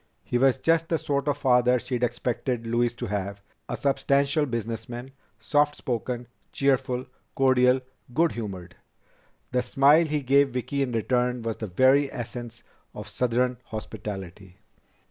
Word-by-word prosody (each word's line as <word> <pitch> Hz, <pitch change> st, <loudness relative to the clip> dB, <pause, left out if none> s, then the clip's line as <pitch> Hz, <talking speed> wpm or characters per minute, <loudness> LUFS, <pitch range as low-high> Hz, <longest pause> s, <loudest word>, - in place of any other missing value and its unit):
He 120 Hz, -, -1 dB
was 135 Hz, 0 st, +4 dB
just 165 Hz, 0 st, +1 dB
the 165 Hz, -, +2 dB
sort 140 Hz, -1 st, -2 dB
of 145 Hz, -1 st, +1 dB
father 125 Hz, -2 st, +4 dB
she'd 125 Hz, 0 st, -3 dB
expected 120 Hz, 0 st, -1 dB
Louise 120 Hz, +1 st, +1 dB
to -, -, -5 dB
have 100 Hz, 0 st, -4 dB, 0.3 s
a -, -, -3 dB
substantial 140 Hz, +2 st, +1 dB
businessman, 115 Hz, +2 st, -5 dB, 0.3 s
soft 145 Hz, +6 st, +1 dB
spoken, 120 Hz, -1 st, -3 dB, 0.3 s
cheerful, 130 Hz, -2 st, +1 dB, 0.3 s
cordial, 130 Hz, -1 st, +4 dB, 0.3 s
good 165 Hz, +6 st, +2 dB
humored. 95 Hz, -6 st, -6 dB, 0.8 s
The 125 Hz, -, +2 dB
smile 140 Hz, +6 st, +4 dB
he 150 Hz, -1 st, -1 dB
gave 140 Hz, +2 st, +4 dB
Vicki 130 Hz, +3 st, -2 dB
in 135 Hz, -2 st, 0 dB
return 125 Hz, +1 st, 0 dB
was 115 Hz, -1 st, -3 dB
the 110 Hz, -, -5 dB
very 130 Hz, +8 st, +4 dB
essence 120 Hz, -1 st, -7 dB, 0.3 s
of 105 Hz, +1 st, -7 dB
southern 125 Hz, +2 st, 0 dB
hospitality. 95 Hz, -4 st, -7 dB
125 Hz, 140 wpm, -26 LUFS, 115-135 Hz, 0.8 s, was